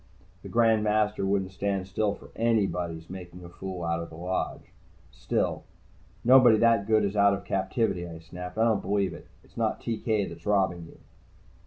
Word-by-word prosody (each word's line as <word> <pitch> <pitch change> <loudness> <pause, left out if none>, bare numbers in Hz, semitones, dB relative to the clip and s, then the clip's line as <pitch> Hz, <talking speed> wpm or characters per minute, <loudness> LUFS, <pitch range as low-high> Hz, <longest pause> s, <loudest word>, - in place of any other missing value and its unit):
The - - -9
Grand 115 -2 +3
Master 105 -1 +1
wouldn't 95 -1 0
stand 100 -1 -2
still 100 +2 0
for - - -15
anybody's 90 -8 0
making 90 -1 -9
a 85 - -10
fool 90 0 -6
out 85 0 -1
of 85 - -7
the 80 - -12
Lodge. 90 +3 -4 0.4
Still: - - -2 0.6
"Nobody 125 -2 +7
that 115 -3 +3
good 110 -1 +3
is 100 +1 -2
out 100 -1 +5
of 100 - -9
captivity," 95 -2 -1
I 85 -1 -8
snapped. 90 +3 -9
"I 110 - +3
don't 110 -3 +2
believe 100 -1 0
it. - - -12 0.2
It's - - -23
not - - 0
TK 110 -3 -1
that's 85 +1 -10
robbing 95 -5 +1
you." - - -16
100 Hz, 180 wpm, -27 LUFS, 90-110 Hz, 0.6 s, Nobody